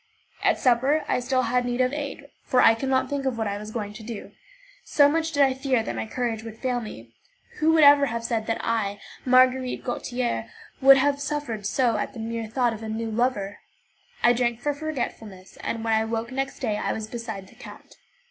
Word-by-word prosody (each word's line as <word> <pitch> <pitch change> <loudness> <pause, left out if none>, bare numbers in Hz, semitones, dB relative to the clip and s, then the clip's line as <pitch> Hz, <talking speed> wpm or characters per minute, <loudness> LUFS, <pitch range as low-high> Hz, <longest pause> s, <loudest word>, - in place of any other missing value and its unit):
At - - +3
supper 265 +5 +2
I - - +1
still 255 +1 0
had 250 +1 +1
need 245 0 -2
of 255 +1 +2
aid, 285 -1 -5 0.2
for 255 - +1
I 225 - +7
could 265 +4 -3
not 260 -1 +2
think 280 -2 -2
of 255 -3 -1
what 220 - -1
I 200 0 -3
was 210 0 -8
going 210 -2 -4
to 220 - -10
do, 220 -1 -7 0.5
so 285 -1 +4
much 320 +2 0
did 285 -2 +4
I 265 -1 +3
fear 260 -3 0
that 120 - -4
my 110 0 -3
courage 235 - -2
would 225 -1 -9
fail 250 0 -1
me. 115 - -10 0.5
Who 310 +1 +4
would 315 -1 +5
ever 285 0 +7
have 235 -1 -3
said 225 -2 -2
that 225 - 0
I, 205 -3 -1 0.3
Marguerite 255 0 +3
Gautier, 245 - -2 0.3
would 270 0 +9
have 280 +1 +1
suffered 280 -8 -3
so 240 -1 +1
at - - -3
the 240 - -9
mere 225 0 -4
thought 240 +1 +1
of 220 - -8
a 220 - -5
new 225 +1 -3
lover? 215 -4 -1 0.6
I 240 - +6
drank 240 -1 0
for 290 +4 -1
forgetfulness, 240 -10 -6
and 225 -1 -4
when 225 -1 +1
I 220 0 +2
woke 225 +2 -3
next 270 +2 -3
day 215 -5 0
I - - -1
was 220 - -4
beside 220 -3 -6
the - - -18
count. - - -13
240 Hz, 220 wpm, -25 LUFS, 220-265 Hz, 0.6 s, would